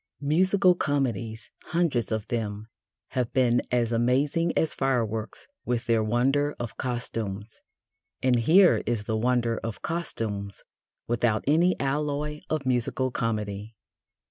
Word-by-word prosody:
Musical 185 +5 +4
comedies, 120 - -2
hundreds 165 -11 0
of 110 -1 -2
them, 105 -3 -3 0.4
have 125 -2 -1
been 120 -2 +3
as 120 -2 +1
amazing 135 +8 +2
as 160 - +1
fireworks 115 -5 -2 0.2
with 120 0 -1
their 115 -2 +2
wonder 135 +6 +1
of 120 -2 -5
costumes, 115 -4 -4 0.6
and 130 -1 +2
here 175 - +5
is 115 -3 0
the 110 +1 -2
wonder 120 0 +1
of 115 -2 -6
costumes 105 -12 -4 0.4
without 115 -2 +1
any 170 +6 +3
alloy 150 +2 -1
of 155 -3 -1
musical 130 +1 0
comedy. 105 -2 -3
120 Hz, 120 wpm, -26 LUFS, 110-145 Hz, 0.6 s, here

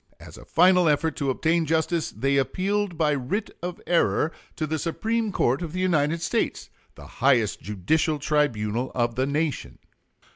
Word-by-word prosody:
As - - -12
a - - -13
final 180 0 +4
effort 155 +2 +1
to 140 -2 -1
obtain 160 +4 +1
justice, 160 +1 0
they 140 +1 0
appealed 190 +6 -1
by 155 -2 +2
writ 140 - -2
of 175 0 -5
error 165 -2 +2 0.2
to 155 - -2
the 155 +1 -2
Supreme 220 +7 -1
Court 135 -5 +1
of 170 -2 -5
the 185 - -3
United 165 -2 +1
States, - - -2 0.2
the 70 - -12 0.2
highest 120 -6 +3
judicial 150 - 0
tribunal 125 -6 0
of 120 -1 +1
the 130 +3 0
nation. 150 -1 -2
155 Hz, 160 wpm, -25 LUFS, 135-170 Hz, 0.2 s, final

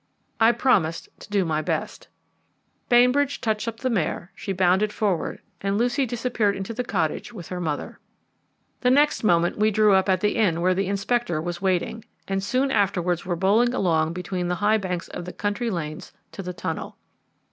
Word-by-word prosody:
I 225 +1 +6
promised 195 -10 +1
to - - -13
do 200 -3 +1
my 155 -1 0
best. - - -3 0.8
Bainbridge 250 +4 +4
touched 220 0 -1
up 225 -1 -5
the 255 - 0
mare, 185 -2 -2
she 195 - -5
bounded 190 +3 +2
forward, 200 -6 -1 0.2
and 200 0 0
Lucy 245 +4 +1
disappeared 230 -3 0
into 195 +4 -5
the 250 +2 -2
cottage 170 -10 -2
with 185 -8 -9
her 180 -1 -4
mother. 155 -4 -4 0.8
The 250 - +2
next 290 +2 +3
moment 175 -2 +2
we 215 +1 +4
drew 215 -1 +4
up 190 +1 +3
at 185 -1 +2
the 210 +2 +1
inn 185 -7 +2
where 185 +1 +3
the 190 +1 -1
Inspector 200 -2 0
was 175 0 -4
waiting, 190 +4 -1 0.2
and 195 0 -1
soon 255 +6 +1
afterwards 180 -5 0
were 175 - 0
bowling 215 +8 +3
along 165 -6 +1
between 180 0 -3
the 180 - 0
high 210 +4 +2
banks 180 -3 -3
of 175 - -6
the 180 - -7
country 205 +3 -2
lanes 155 -6 -5 0.2
to - - -7
the 180 -1 -5
tunnel. 170 - -5
195 Hz, 185 wpm, -24 LUFS, 180-225 Hz, 0.8 s, I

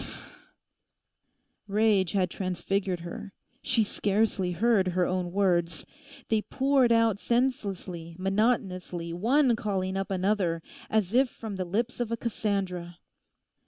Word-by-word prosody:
Phh!' - - -9 1.5
Rage 205 -3 +2
had 185 -3 +1
transfigured 185 0 -2
her. 175 +3 -7 0.3
She 225 - +2
scarcely 200 -3 0
heard 210 -1 +3
her 180 0 +1
own 180 -1 -1
words. 175 -4 +1 0.4
They 220 -1 +2
poured 265 0 +2
out 230 -3 +3
senselessly, 195 -10 -2
monotonously, 185 -4 0
one 240 - +3
calling 195 -4 -2
up 195 0 -2
another, 185 -3 0 0.3
as 215 -2 +1
if 255 +1 +4
from 220 -3 -7
the 185 -1 -3
lips 225 +9 -2
of 240 -2 -2
a 230 - 0
Cassandra. 190 -6 -2
195 Hz, 125 wpm, -28 LUFS, 180-225 Hz, 1.5 s, if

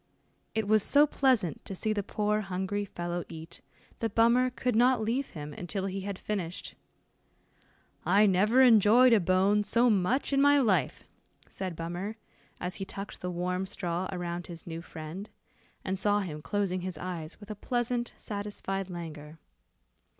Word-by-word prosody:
It 220 -2 0
was 215 0 +4
so 290 +8 +5
pleasant 255 - +1
to 195 - -5
see 215 +3 0
the 205 - -1
poor 210 +2 0
hungry 195 +1 -2
fellow 175 -2 -4
eat, 160 0 -9 0.4
that 225 -3 -2
Bummer 235 +3 +4
could 250 -1 -2
not 245 +2 +4
leave 250 +5 -1
him 150 0 -6
until 190 +4 -4
he 195 0 -3
had 200 0 -4
finished. 185 -5 -4 1.3
"I 205 +2 +5
never 210 +7 +4
enjoyed 235 +1 +7
a 225 - +6
bone 190 +3 +3
so 235 +3 +3
much 215 +9 +1
in 275 - +4
my 285 0 +6
life," 195 - +1 0.5
said 185 -3 -4
Bummer, 175 +6 -4 0.4
as 180 +1 -3
he - - -4
tucked 195 +1 -7
the 180 - -3
warm 180 +2 -2
straw 180 -2 -3
around 175 -1 -4
his 170 -3 -9
new 165 -1 -6
friend, 170 +5 -8 0.6
and 190 0 -1
saw 205 +1 +3
him 155 -6 -5
closing 190 +1 -1
his 185 0 -5
eyes 175 -3 -6
with 205 0 -9
a - - -5
pleasant 240 +2 -2
satisfied 200 -2 -4
languor. 160 -3 -8
195 Hz, 160 wpm, -29 LUFS, 180-220 Hz, 1.3 s, enjoyed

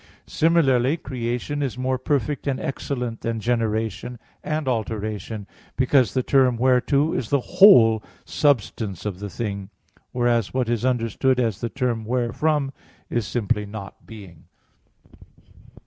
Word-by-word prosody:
Similarly 150 -4 +2
creation 125 +1 -3
is 130 -4 -2
more 130 0 -1
perfect 140 +1 -1
and 135 -2 0
excellent 125 -5 -4
than 115 -1 -2
generation 115 +1 -2 0.3
and 155 -2 -2
alteration, 110 -2 -3 0.3
because 130 -3 +3
the 130 - +1
term 130 -3 +3
whereto 130 +5 +2
is 115 - -3
the 140 - +3 0.2
whole 115 - +8 0.2
substance 110 - 0
of 100 -3 -4
the 100 0 -5
thing; 100 -2 -5 0.4
whereas 120 -2 0
what 125 -3 0
is 120 0 0
understood 125 +1 +1
as 115 -6 -1
the 120 - -2
term 125 -3 -2
wherefrom 135 +5 0 0.4
is 120 -3 -1
simply 105 -3 -1
not 100 -1 -9
being. 95 -7 -12
120 Hz, 130 wpm, -23 LUFS, 110-130 Hz, 0.4 s, whole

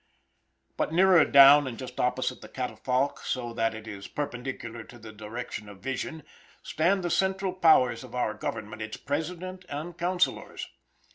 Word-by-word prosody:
But - - -1
nearer 180 -1 +6
down, 140 +1 +8
and 120 -3 -6
just 130 -1 -8
opposite 125 +1 0
the - - -11
catafalque 125 +2 -1
so 120 -2 -3
that 115 -1 0
it 110 0 -9
is 100 -2 -7
perpendicular 120 -4 -5
to 120 - -14
the 110 -1 -11
direction 110 0 -7
of 100 -2 -13
vision, 135 +4 -4 0.4
stand 185 +4 +1
the 175 - -1
central 190 0 0
powers 130 -10 +4
of - - -10
our 120 -4 0
government, 110 +1 -5
its 110 0 -5
President 180 +6 -4
and 155 +4 -5
counsellors. 180 +1 -1
130 Hz, 155 wpm, -28 LUFS, 115-170 Hz, 0.4 s, down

